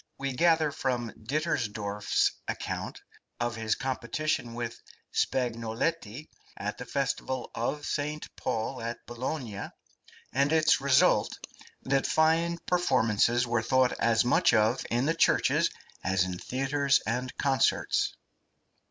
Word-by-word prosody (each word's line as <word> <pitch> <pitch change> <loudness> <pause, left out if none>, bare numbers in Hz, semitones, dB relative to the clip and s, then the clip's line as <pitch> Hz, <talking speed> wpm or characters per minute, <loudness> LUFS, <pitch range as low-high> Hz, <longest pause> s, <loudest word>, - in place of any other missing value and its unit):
We 135 -1 -3
gather 160 +1 +3
from 125 -4 -2
Dittersdorf's 110 -7 -1 0.2
account - - -4 0.4
of 120 -1 -1
his 110 -1 0
competition 130 0 -2
with 120 -1 -5 0.3
Spagnoletti 120 +3 -1 0.3
at - - -4
the - - -7
festival 130 -1 -2
of 145 +5 -2
St. 150 +1 -3
Paul 115 +3 -3
at 115 +1 -5
Bologna 120 -3 -4 0.6
and 140 +3 +2
its 160 -3 +4
result, 135 -2 +3 0.5
that 135 0 +1
fine 165 +2 +2
performances 120 - +2
were 120 -1 0
thought 130 +2 +3
as 115 0 +3
much 120 -1 +4
of 110 +4 +2
in 120 +3 +1
the 160 - +2
churches 165 - +3 0.3
as 95 0 +2
in 90 -1 -4
theatres 140 +2 +1
and 125 +3 -3
concerts. 135 -2 +1
125 Hz, 115 wpm, -29 LUFS, 115-145 Hz, 0.6 s, its